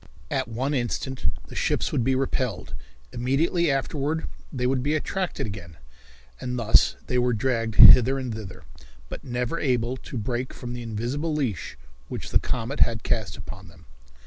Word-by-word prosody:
At - - 0
one 130 +5 -2
instant 130 - -2 0.2
the - - -12
ships - - 0
would 120 - +1
be 130 +2 +2
repelled; 130 -6 -2 0.4
immediately 155 +7 +1
afterward 145 +3 -1 0.3
they 125 -3 -2
would 130 0 +1
be 145 +4 +1
attracted 185 +4 -2
again, 95 -6 -8 0.6
and 125 0 -3
thus 115 -2 +4
they 125 - 0
were 125 0 +2
dragged 115 -2 -1
hither 130 +2 +9
and 130 -3 -3
thither, 95 -5 -8 0.5
but - - -7
never 125 +5 -2
able 125 -2 0
to 130 - -7
break 120 +3 -3
from 120 -1 -6
the 120 - -5
invisible 120 +8 -2
leash 125 - -2 0.3
which - - -6
the - - +5
comet 125 +4 -3
had 115 -1 +3
cast 95 -10 -1
upon 95 -3 -9
them. 85 -1 -17
125 Hz, 165 wpm, -25 LUFS, 115-135 Hz, 0.6 s, hither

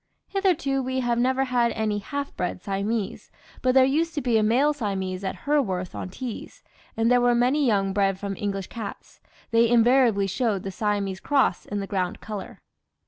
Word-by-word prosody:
Hitherto 345 -9 +1
we 260 0 -2
have 240 -1 0
never 260 +2 +2
had 245 -3 +1
any 215 -2 -1
half 280 +7 -5
bred 180 0 -3
Siamese; 200 +2 -3 0.3
but 255 0 +2
there 260 -1 +7
used 320 +5 0
to 295 - -1
be 245 -3 +1
a 220 - +4
male 255 +8 +3
Siamese 195 -7 -3
at 190 - -2
Hurworth 200 -12 0
on - - -5
Tees, 240 +4 -7 0.3
and 225 +1 +2
there 245 0 +5
were 245 0 +4
many 255 +5 +2
young 195 -3 +1
bred 195 -1 +1
from 200 -1 -4
English 195 -1 -3
cats. 220 -1 -9 0.3
They 230 0 +4
invariably 235 -3 +4
showed 200 0 -1
the 195 - -4
Siamese 200 -2 -1
cross 275 -8 +1
in 205 0 -3
the - - -3
ground 185 -3 -2
colour." 210 -3 -7
230 Hz, 185 wpm, -25 LUFS, 195-260 Hz, 0.3 s, there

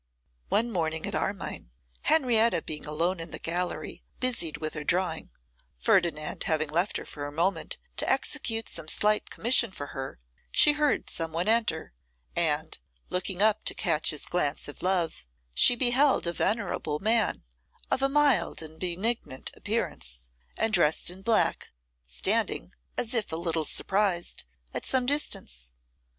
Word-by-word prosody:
One 235 +2 +2
morning 160 -4 -1
at - - -2
Armine, - - -3 0.3
Henrietta 235 - +3
being 150 -1 -3
alone 170 +4 0
in 165 0 -5
the - - -5
gallery 175 +2 -2 0.2
busied 235 -11 +1
with 155 -1 -4
her 150 - -4
drawing, 170 0 -1 0.5
Ferdinand 155 - +1
having 155 -1 0
left 175 +5 0
her - - -8
for 145 -1 -6
a - - -7
moment 190 - -1 0.2
to - - 0
execute 225 -1 0
some 165 -2 -5
slight 210 +5 +1
commission 235 0 +3
for 145 -6 -7
her, 135 - -6 0.3
she 295 - +6
heard 295 0 +1
some 165 -1 -2
one 170 +4 -1
enter, 220 - +1 0.4
and, - - 0 0.3
looking 180 +1 0
up 215 0 +3
to - - 0
catch 165 -6 +2
his 150 - 0
glance 155 -5 -1
of 145 - -7
love, 175 - 0 0.3
she 245 - +7
beheld 260 +1 +3
a 170 - 0
venerable 185 -8 -1
man, 220 +4 +1 0.5
of - - +1
a 275 - +2
mild 275 - +2
and 160 0 -9
benignant 185 - -2
appearance, - - -3 0.3
and 225 -1 0
dressed 170 -2 +3
in 185 +1 -10
black, 220 +2 +2 0.4
standing, - - +1 0.2
as 230 -1 0
if 225 -4 +1
a - - -1
little 165 -1 -1
surprised, 190 - +1 0.3
at - - -3
some 260 -1 +1
distance. 60 - -2
180 Hz, 150 wpm, -28 LUFS, 155-225 Hz, 0.5 s, she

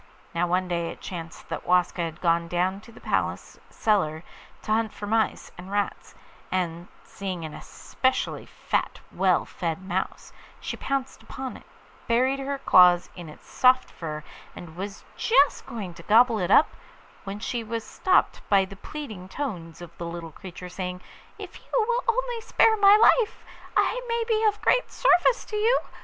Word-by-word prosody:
Now 175 +1 +1
one 180 +1 +1
day 170 -1 -1
it - - -9
chanced 170 -2 -8
that - - -5
Waska 180 0 +2
had 165 -2 -4
gone 170 -1 +2
down 180 +3 -1
to 230 - -15
the - - -15
palace - - -2
cellar 165 -7 0 0.4
to - - -4
hunt 220 0 +1
for 205 - -6
mice 220 +1 0
and 180 +2 -9
rats, 205 0 -3 0.4
and 175 -1 -2 0.2
seeing 185 -4 -5
an 155 - -7
especially 260 0 -2
fat, - - -2
well - - +2
fed 170 0 -4
mouse, - - -3 0.3
she - - -5
pounced 275 -1 -3
upon 265 -1 -7
it, - - -14 0.4
buried 255 +4 +2
her 275 +1 -3
claws 180 -8 +5
in 175 -3 -9
its 150 - -14
soft 255 0 +3
fur, 155 -2 -6 0.3
and 165 -2 -10
was 195 +3 -6
just 465 - +3
going 200 -7 -6
to - - -12
gobble 230 +1 +4
it 180 -1 -1
up, 290 - +6 0.5
when 195 0 -5
she 230 +2 -3
was 225 0 -4
stopped 370 +9 +1
by 195 -2 +5
the 195 +1 -12
pleading 215 -10 -8
tones 175 - -5
of 170 -1 -12
the 170 - -4
little 170 -1 -7
creature, 180 +2 -9
saying, 180 0 -5 0.4
'If - - -9
you - - -25 0.2
will 485 +1 +1
only 480 0 0
spare 450 0 +4
my 400 0 +7
life 455 0 +3 0.3
I - - +2
may 465 0 0
be 445 -1 +1
of 420 -1 +1
great - - +3
service - - +3
to 425 - -4
you. 455 +4 +3
200 Hz, 175 wpm, -26 LUFS, 175-275 Hz, 0.5 s, my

